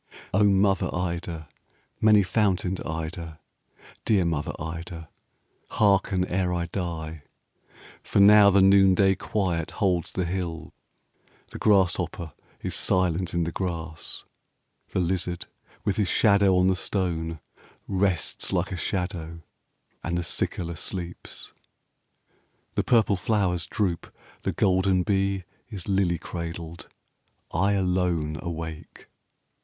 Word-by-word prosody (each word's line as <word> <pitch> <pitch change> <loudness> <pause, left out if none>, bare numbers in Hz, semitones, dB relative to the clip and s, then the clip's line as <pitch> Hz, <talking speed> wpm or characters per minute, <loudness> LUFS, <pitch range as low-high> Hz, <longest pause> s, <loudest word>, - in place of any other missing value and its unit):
'O 100 +3 +4
mother 100 -1 +3
Ida, 85 -2 -3 0.5
many 105 -2 +6
fountained 95 -2 0
Ida, 80 0 -5 0.6
Dear 100 -5 +3
mother 80 -3 -1
Ida, 80 0 -7 0.6
hearken 100 -3 +2
ere 90 0 0
I 85 -1 -1
die. 80 -3 -4 0.8
For - - 0
now 105 0 +8
the 100 -1 +5
noonday 95 0 +5
quiet 90 -4 -1
holds 90 -5 +1
the 90 - -1
hill: 85 -2 -4 0.8
The - - -7
grasshopper 90 -5 +1 0.3
is - - -3
silent 90 -1 +1
in 85 - +2
the 85 - -2
grass: 85 -3 -5 0.7
25 - - -23
The - - +1
lizard, 90 0 -1 0.4
with 100 - 0
his 105 -3 +2
shadow 100 -3 +4
on 90 - +4
the 95 0 +3
stone, 85 -4 -2 0.5
Rests 95 -4 0
like - - 0
a 95 - -3
shadow, 85 -3 -3 0.6
and 85 +1 -1
the 85 - -1
cicala 85 +1 -1
sleeps. 90 -1 -6 1.2
The - - 0
purple 110 -4 +3
flowers 90 -4 0
droop: 90 -5 -2 0.3
the - - -1
golden 95 -1 +2
bee 95 -1 0 0.3
Is 100 -7 -7
lily 95 -3 +2
cradled: 85 0 -7 0.6
I 95 +5 +2
alone 90 -5 0
awake. 80 -2 -7
90 Hz, 115 wpm, -26 LUFS, 85-95 Hz, 1.2 s, now